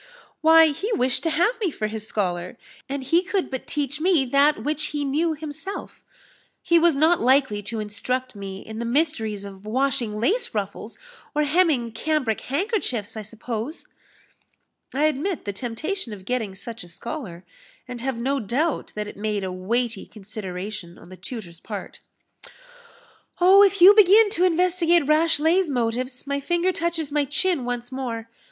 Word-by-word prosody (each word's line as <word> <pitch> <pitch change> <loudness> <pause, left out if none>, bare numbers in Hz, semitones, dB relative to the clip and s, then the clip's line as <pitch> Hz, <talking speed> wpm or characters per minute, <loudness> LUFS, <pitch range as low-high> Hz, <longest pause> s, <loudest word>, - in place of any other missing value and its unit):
"Why, 320 0 +7
he 390 +10 -3
wished 250 - +1
to 330 - 0
have 355 +10 +1
me 405 -5 0
for 220 -8 -4
his 215 0 -4
scholar, 180 0 -2 0.3
and 275 0 -3
he 335 +6 +3
could 380 -2 -2
but 260 - -5
teach 295 0 -2
me 340 -6 +3
that 280 +4 +3
which 305 +1 -1
he 290 -1 -3
knew 315 +4 0
himself 315 +6 -7 0.6
he 340 0 +4
was 335 -2 +4
not 320 +5 +3
likely 255 -4 +3
to 220 +2 -4
instruct 250 +4 -3
me 195 -1 -7
in 220 0 -7
the 235 - -3
mysteries 230 -7 0
of 195 -1 -10
washing 240 -1 0
lace 390 - 0
ruffles, 205 +2 -4 0.4
or 300 - +3
hemming 295 -6 +2
cambric 255 -1 -1
handkerchiefs, 275 - -1
I 220 - -4
suppose." 225 - -6 1.1
"I 280 +3 0
admit 310 +4 0
the 200 - -3
temptation 245 - -3
of 190 -2 -11
getting 225 -5 -2
such 230 +2 -7
a - - -12
scholar, 190 - -7 0.4
and 245 -1 -6
have 265 -1 -2
no 270 +4 0
doubt 270 +8 -1
that 210 0 -3
it - - -10
made 210 -1 -2
a 190 - -3
weighty 225 +4 -2
consideration 195 -3 -7
on 170 - -15
the 185 - -10
tutor's 185 -3 -8
part." - - -7 1.4
"Oh, 375 +3 +7
if 400 -2 +4
you 385 +3 +11
begin 415 +1 +6
to 365 -2 +2
investigate 345 -2 +3
Rashleigh's 320 +3 +3
motives, 250 +1 -2
my 280 0 -1
finger 345 +5 +1
touches 330 -4 -2
my 295 0 +2
chin 295 0 +1
once 245 0 -4
more. 230 -4 -5
265 Hz, 165 wpm, -24 LUFS, 220-325 Hz, 1.4 s, you